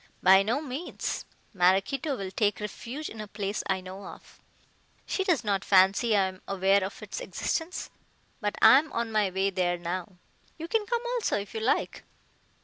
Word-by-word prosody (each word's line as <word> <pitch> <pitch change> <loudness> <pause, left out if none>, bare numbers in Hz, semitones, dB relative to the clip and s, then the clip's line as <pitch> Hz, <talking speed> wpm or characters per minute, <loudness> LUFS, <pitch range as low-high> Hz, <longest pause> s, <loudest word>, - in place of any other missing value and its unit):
"By 190 +1 +7
no 230 +8 0
means. 295 +3 -4 0.3
Maraquito 195 - +2
will 195 -3 -5
take 205 0 +1
refuge 235 +8 -6
in 220 - -8
a 210 - -7
place 205 0 -3
I 190 -1 0
know 190 +2 -9
of. - - -12 0.7
She 385 - -1
does 355 -7 +1
not 200 -2 0
fancy 200 +4 +4
I 195 - +4
am 185 0 -4
aware 195 0 +3
of 195 +3 -6
its 195 -2 -6
existence. 325 - -3 0.5
But 210 -4 -2
I 225 +5 +9
am 310 +1 -6
on 230 -1 -2
my 210 -2 +2
way 190 +1 0
there 180 -1 0
now. 175 +2 -4 0.4
You 325 0 -6
can 430 +1 0
come 475 0 -1
also 475 - 0
if 200 0 -6
you 220 - -3
like." 225 +3 0
205 Hz, 180 wpm, -28 LUFS, 190-255 Hz, 0.7 s, I